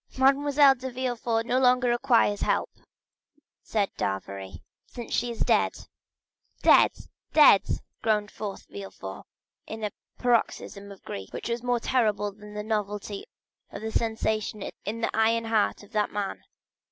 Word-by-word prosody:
"Mademoiselle 280 +1 +5
de 260 0 -6
Villefort 240 -3 -1
no 250 +2 +2
longer 250 -1 +4
requires 240 -4 +3
help," - - 0 0.9
said 205 -3 0
d'Avrigny, 95 0 -4 0.2
"since 240 -2 -8
she 245 - +1
is 235 - -6
dead." - - +3 0.9
"Dead,—dead!" 295 -10 +5 0.4
groaned 210 -2 +1
forth 205 -2 -6
Villefort, 95 -1 -9 0.4
in 220 0 -7
a 210 - -1 0.3
paroxysm 220 -4 0
of 195 - -13
grief, 95 0 -7
which - - -5
was 235 0 -1
the 250 - -9
more 245 -1 +2
terrible 210 -5 +1
from 210 0 -13
the 210 - -3
novelty 210 -1 -3 0.5
of 200 - -8
the 220 - -3
sensation 220 -2 -1 0.2
in 225 +2 -3
the - - -1
iron 225 +1 +2
heart 220 -2 +1
of 205 - -17
that 210 -2 +1
man. 205 -1 -4
220 Hz, 140 wpm, -27 LUFS, 205-245 Hz, 0.9 s, Mademoiselle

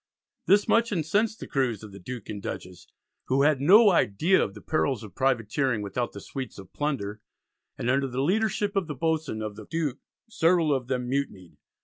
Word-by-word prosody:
This 205 +1 +5
much 230 0 +3
incensed 205 +6 0
the - - -6
crews 120 -6 -1
of 105 - -9
the 100 - -11
Duke 120 +3 -7
and 105 -2 -6
Dutchess 90 -2 -7 0.4
who 135 +2 +2
had 145 -2 +3
no 205 +8 +7
idea 165 - +3
of - - -5
the - - -9
perils 135 -7 0
of 105 - -10
privateering 130 -2 0
without 110 +5 -2
the 100 - -7
sweets 130 +5 -7
of 95 -2 -12
plunder, 110 -8 -3 0.6
and - - -3
under 135 +2 +2
the 130 +1 -2
leadership 205 +3 0
of 195 -4 0
the 150 - -5
boatswain 155 -6 -1
of 105 -1 -5
the 110 -1 -11
Duke 155 -6 -2 0.3
several 165 -6 +3
of 130 -3 -2
them 125 -1 -2
mutinied. 125 -10 -3
135 Hz, 195 wpm, -27 LUFS, 110-165 Hz, 0.6 s, no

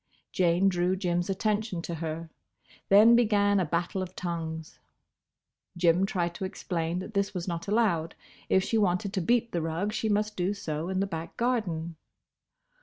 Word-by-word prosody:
Jane 180 +1 +3
drew 180 0 +1
Jim's 175 -1 -1
attention 205 -2 -1
to 170 - -4
her. 160 0 -5 0.6
Then 215 +4 +8
began 205 -4 +3
a 185 - +1
battle 170 +4 -1
of 185 0 -6
tongues. 160 -2 -5 1.0
Jim 175 +2 +3
tried 175 -3 -1
to 180 - -6
explain 175 -3 -3
that 190 +4 -6
this 200 -1 0
was 175 0 -3
not 170 0 -4
allowed. 200 -7 +1 0.3
If 190 - +4
she 225 - +1
wanted 195 0 +1
to 190 - 0
beat 235 +6 +1
the 170 - -1
rug, 165 +6 -2
she 220 - -1
must 210 +1 0
do 185 +3 -1
so 160 -3 -4
in 190 0 0
the - - +2
back 165 -3 -6
garden. 175 -10 -1
185 Hz, 170 wpm, -28 LUFS, 170-205 Hz, 1.0 s, Then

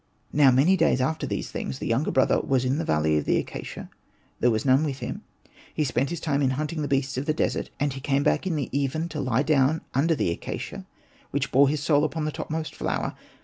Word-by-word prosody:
Now 145 -2 +6
many 140 +9 +4
days 165 -7 +3
after 135 +5 -1
these - - -3
things, 65 - -4
the - - -6
younger 125 +7 +1
brother 130 - +3
was 130 -2 +1
in 135 +4 +1
the - - -1
valley 75 - +2
of - - -5
the - - +2
acacia; - - -6 0.5
there 125 - +4
was 110 +1 0
none 135 +2 +4
with 140 -4 -2
him; - - -5 0.5
he 155 - +1
spent 130 0 0
his 170 -1 -4
time 145 -3 0
in 135 - +3
hunting 155 +1 -2
the 145 - -1
beasts 135 -1 0
of 140 - -5
the 155 - +1
desert, - - -1
and 145 -2 0
he 135 - -7
came 140 0 +1
back 190 - +1
in 175 - 0
the 145 -4 -1
even 140 +4 -1
to 155 -2 -4
lie 130 0 +1
down 150 +1 +2
under 160 +5 +2
the 90 - 0
acacia, 85 - -6 0.4
which - - -2
bore 135 +2 +5
his 145 0 -2
soul 145 +1 +3
upon 155 0 -1
the 155 - -1
topmost 160 +1 -4
flower. - - -2
140 Hz, 235 wpm, -25 LUFS, 130-155 Hz, 0.5 s, Now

